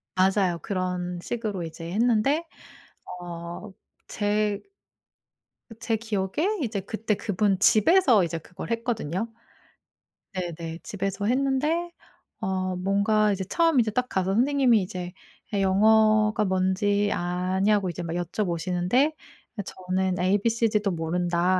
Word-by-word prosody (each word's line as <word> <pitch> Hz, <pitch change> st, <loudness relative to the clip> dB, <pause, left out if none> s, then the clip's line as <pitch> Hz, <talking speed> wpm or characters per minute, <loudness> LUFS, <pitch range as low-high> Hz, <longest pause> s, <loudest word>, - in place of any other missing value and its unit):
맞아요. 185 Hz, -2 st, +2 dB
그런 180 Hz, -2 st, -2 dB
식으로 215 Hz, -2 st, -3 dB
이제 165 Hz, 0 st, -7 dB
했는데 240 Hz, -, +2 dB, 0.7 s
어 175 Hz, +3 st, -7 dB, 0.4 s
제 210 Hz, 0 st, 0 dB, 1.2 s
제 225 Hz, -, 0 dB
기억에 210 Hz, -4 st, -2 dB, 0.3 s
이제 220 Hz, -5 st, -2 dB
그때 215 Hz, +2 st, -2 dB
그분 200 Hz, -1 st, 0 dB
집에서 225 Hz, -, +5 dB
이제 165 Hz, 0 st, -3 dB
그걸 180 Hz, +6 st, -9 dB
했거든요. 230 Hz, -4 st, -2 dB, 1.1 s
네네. 170 Hz, -3 st, -5 dB
집에서 195 Hz, 0 st, -3 dB
했는데 275 Hz, +8 st, +1 dB, 0.5 s
어 185 Hz, -1 st, -2 dB
뭔가 200 Hz, +3 st, +2 dB
이제 195 Hz, -1 st, -2 dB
처음 330 Hz, -, +2 dB
이제 220 Hz, -2 st, +2 dB
딱 250 Hz, +3 st, 0 dB
가서 190 Hz, 0 st, 0 dB
선생님이 250 Hz, -1 st, +3 dB
이제 180 Hz, -1 st, -5 dB, 0.4 s
"얘 200 Hz, -, +1 dB
영어가 215 Hz, +2 st, +4 dB
뭔지 195 Hz, +2 st, +1 dB
아냐?"고 185 Hz, +3 st, 0 dB
이제 175 Hz, -, -5 dB
막 165 Hz, -1 st, -4 dB
여쭤보시는데 180 Hz, -, 0 dB, 0.4 s
아 -, -, -1 dB
저는 185 Hz, 0 st, -2 dB
"에이 185 Hz, +3 st, +2 dB
비 230 Hz, -, +1 dB
시 230 Hz, 0 st, +1 dB
디도 210 Hz, -2 st, +1 dB
모른다." 175 Hz, +2 st, 0 dB
195 Hz, 255 characters per minute, -26 LUFS, 180-220 Hz, 1.2 s, 집에서